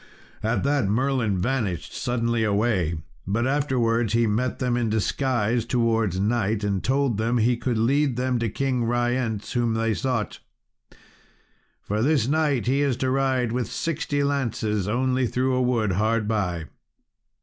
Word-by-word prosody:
At 110 Hz, +2 st, 0 dB
that 140 Hz, -5 st, +1 dB
Merlin 115 Hz, -2 st, +1 dB
vanished 100 Hz, -4 st, -2 dB
suddenly 115 Hz, -2 st, -1 dB
away; 100 Hz, -5 st, +1 dB, 0.3 s
but 110 Hz, +4 st, 0 dB
afterwards 120 Hz, -5 st, +1 dB
he 115 Hz, 0 st, +3 dB
met 115 Hz, +4 st, 0 dB
them 125 Hz, -2 st, 0 dB
in 120 Hz, -2 st, 0 dB
disguise 115 Hz, +1 st, 0 dB
towards 115 Hz, -5 st, +1 dB
night, 105 Hz, 0 st, 0 dB
and 100 Hz, -2 st, -1 dB
told 135 Hz, -3 st, +1 dB
them 115 Hz, +2 st, +1 dB
he 120 Hz, +2 st, +3 dB
could 120 Hz, 0 st, -2 dB
lead 135 Hz, +3 st, +2 dB
them 125 Hz, -1 st, 0 dB
to 115 Hz, -1 st, -1 dB
King 130 Hz, +1 st, -1 dB
Ryence, 120 Hz, -2 st, -1 dB
whom 120 Hz, -2 st, 0 dB
they 115 Hz, 0 st, +1 dB
sought. 115 Hz, -1 st, -2 dB, 1.4 s
"For 105 Hz, +2 st, -2 dB
this 135 Hz, -2 st, +2 dB
night 150 Hz, -4 st, +1 dB
he 135 Hz, +3 st, +2 dB
is 140 Hz, -4 st, +1 dB
to 130 Hz, -1 st, 0 dB
ride 130 Hz, -3 st, +1 dB
with 125 Hz, 0 st, -2 dB
sixty 150 Hz, -3 st, -1 dB
lances 115 Hz, -8 st, -1 dB
only 130 Hz, +3 st, +1 dB
through 130 Hz, +2 st, 0 dB
a 130 Hz, -, +1 dB
wood 120 Hz, -5 st, +1 dB
hard 110 Hz, +3 st, +1 dB
by." 90 Hz, -7 st, -1 dB
120 Hz, 150 wpm, -24 LUFS, 110-130 Hz, 1.4 s, he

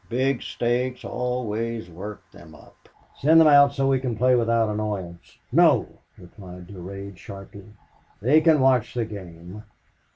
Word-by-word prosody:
Big 130 Hz, +1 st, 0 dB
stakes 125 Hz, +1 st, -2 dB
always 115 Hz, -3 st, -3 dB
work 100 Hz, +5 st, -9 dB
them -, -, -15 dB
up." -, -, -20 dB, 0.3 s
"Send 160 Hz, +4 st, +5 dB
them 160 Hz, -, +6 dB
out 140 Hz, -1 st, +6 dB
so 135 Hz, -1 st, 0 dB
we 135 Hz, -1 st, +2 dB
can 125 Hz, -4 st, -4 dB
play 125 Hz, +2 st, +3 dB
without 115 Hz, -2 st, +2 dB
annoyance." 105 Hz, -5 st, -5 dB
"No," -, -, +4 dB, 0.3 s
replied 90 Hz, 0 st, -12 dB
Durade, 100 Hz, +1 st, -9 dB
sharply. 100 Hz, +2 st, -11 dB, 0.5 s
"They 135 Hz, +10 st, +4 dB
can 155 Hz, -3 st, +4 dB
watch 130 Hz, -4 st, +2 dB
the 120 Hz, -2 st, -1 dB
game." 90 Hz, -2 st, -10 dB
115 Hz, 140 wpm, -24 LUFS, 100-130 Hz, 0.5 s, them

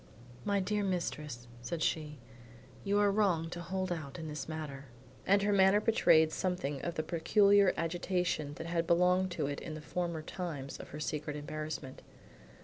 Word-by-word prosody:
"My 200 Hz, -1 st, +2 dB
dear 205 Hz, +2 st, 0 dB
mistress," 150 Hz, -9 st, -3 dB
said 160 Hz, +7 st, -3 dB
she, 150 Hz, -2 st, -1 dB, 0.7 s
"you 200 Hz, +1 st, +1 dB
are 205 Hz, -1 st, +4 dB
wrong 180 Hz, -6 st, +1 dB
to 175 Hz, -, -5 dB
hold 185 Hz, +1 st, -3 dB
out 155 Hz, -4 st, -4 dB
in 160 Hz, -2 st, -6 dB
this 150 Hz, +1 st, -5 dB
matter." 150 Hz, -3 st, -5 dB, 0.4 s
And 200 Hz, +1 st, +4 dB
her 205 Hz, 0 st, +2 dB
manner 195 Hz, +1 st, +6 dB
betrayed 160 Hz, -8 st, +4 dB
something 155 Hz, -8 st, -2 dB
of 170 Hz, -1 st, -3 dB
the 155 Hz, -, -1 dB
peculiar 200 Hz, +4 st, +4 dB
agitation 170 Hz, -3 st, -1 dB
that 165 Hz, -, -6 dB
had 170 Hz, -1 st, -1 dB
belonged 180 Hz, +2 st, +4 dB
to 175 Hz, -, -1 dB
it 140 Hz, 0 st, -3 dB
in 155 Hz, -, -6 dB
the -, -, -6 dB
former 170 Hz, 0 st, -3 dB
times 155 Hz, -7 st, -5 dB
of -, -, -9 dB
her 150 Hz, -, -7 dB
secret 150 Hz, 0 st, -3 dB
embarassment. 150 Hz, -2 st, -5 dB
170 Hz, 170 wpm, -33 LUFS, 150-185 Hz, 0.7 s, manner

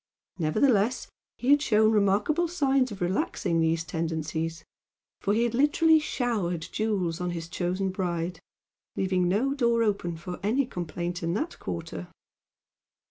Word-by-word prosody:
Nevertheless 215 Hz, -, +2 dB, 0.3 s
he 255 Hz, +3 st, +1 dB
had 290 Hz, 0 st, +6 dB
shown 220 Hz, -5 st, +4 dB
remarkable 210 Hz, -, +2 dB
signs 275 Hz, -7 st, +1 dB
of 195 Hz, -, -8 dB
relaxing 175 Hz, -1 st, 0 dB
these 165 Hz, 0 st, +1 dB
tendencies; 160 Hz, 0 st, -3 dB, 0.5 s
for 200 Hz, -, 0 dB
he 230 Hz, -, +2 dB
had 240 Hz, -1 st, 0 dB
literally 310 Hz, +5 st, +4 dB
showered 205 Hz, -, -2 dB
jewels 190 Hz, -6 st, -1 dB
on 180 Hz, -, -1 dB
his 165 Hz, -1 st, -4 dB
chosen 180 Hz, +3 st, -1 dB
bride, 175 Hz, -2 st, -2 dB, 0.6 s
leaving 185 Hz, -1 st, +1 dB
no 225 Hz, +10 st, +1 dB
door 235 Hz, -4 st, +2 dB
open 195 Hz, -6 st, -1 dB
for 180 Hz, +2 st, -7 dB
any 235 Hz, +7 st, +1 dB
complaint 175 Hz, -3 st, -4 dB
in 170 Hz, +1 st, -1 dB
that 310 Hz, +10 st, -3 dB
quarter. -, -, -5 dB
195 Hz, 135 wpm, -27 LUFS, 170-240 Hz, 0.6 s, had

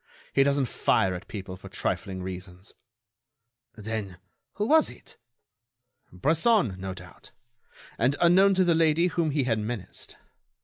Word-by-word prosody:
He 135 Hz, -, +4 dB
doesn't 140 Hz, 0 st, +2 dB
fire 95 Hz, -5 st, +1 dB
at 90 Hz, +3 st, -8 dB
people 95 Hz, -3 st, -7 dB
for -, -, -12 dB
trifling 95 Hz, -2 st, -3 dB
reasons." 90 Hz, +1 st, -9 dB, 1.0 s
"Then, 110 Hz, -4 st, -5 dB, 0.4 s
who 210 Hz, -, -2 dB
was 315 Hz, +6 st, +4 dB
it?" -, -, -14 dB, 1.0 s
"Bresson, 160 Hz, -, +2 dB
no 95 Hz, 0 st, -5 dB
doubt, -, -, -14 dB, 0.7 s
and 130 Hz, +4 st, +2 dB
unknown 190 Hz, +3 st, +5 dB
to 185 Hz, -, +3 dB
the 175 Hz, -2 st, +3 dB
lady 165 Hz, +1 st, +3 dB
whom 165 Hz, -2 st, 0 dB
he 145 Hz, -1 st, 0 dB
had 115 Hz, -3 st, 0 dB
menaced. 105 Hz, -3 st, -6 dB
120 Hz, 135 wpm, -26 LUFS, -, 1.0 s, unknown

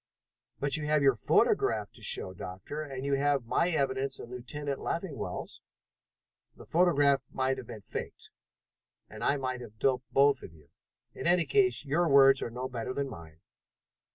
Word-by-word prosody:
"But 140 Hz, +1 st, 0 dB
you 150 Hz, -1 st, -4 dB
have 150 Hz, -1 st, +3 dB
your 135 Hz, -1 st, +6 dB
photograph 110 Hz, -, +2 dB
to -, -, -17 dB
show, 95 Hz, -, -1 dB
Doctor, 95 Hz, +11 st, -7 dB
and 135 Hz, -3 st, -6 dB
you 140 Hz, -, 0 dB
have 140 Hz, -3 st, +1 dB
my 170 Hz, +9 st, +1 dB
evidence 135 Hz, -4 st, -1 dB
and 120 Hz, -, -10 dB
Lieutenant 140 Hz, +3 st, -5 dB
Leffingwell's." 170 Hz, -4 st, -4 dB, 0.9 s
"The -, -, -13 dB
photograph 145 Hz, -5 st, +3 dB
might 130 Hz, 0 st, -1 dB
have 120 Hz, -, -9 dB
been 115 Hz, -3 st, -8 dB
faked -, -, -7 dB, 0.8 s
and -, -, -8 dB
I 145 Hz, -, +2 dB
might 130 Hz, -2 st, -3 dB
have 110 Hz, -3 st, -11 dB
doped 130 Hz, +1 st, 0 dB
both 140 Hz, -1 st, +4 dB
of 80 Hz, -, -11 dB
you. 75 Hz, -2 st, -21 dB, 0.4 s
In -, -, -4 dB
any 175 Hz, -1 st, +4 dB
case, 385 Hz, -, +2 dB
your 160 Hz, +4 st, +1 dB
words 135 Hz, -1 st, +6 dB
are -, -, -2 dB
no 125 Hz, +2 st, -4 dB
better 125 Hz, 0 st, -5 dB
than 140 Hz, -1 st, -2 dB
mine. 80 Hz, -3 st, -12 dB
135 Hz, 170 wpm, -30 LUFS, 125-145 Hz, 0.9 s, your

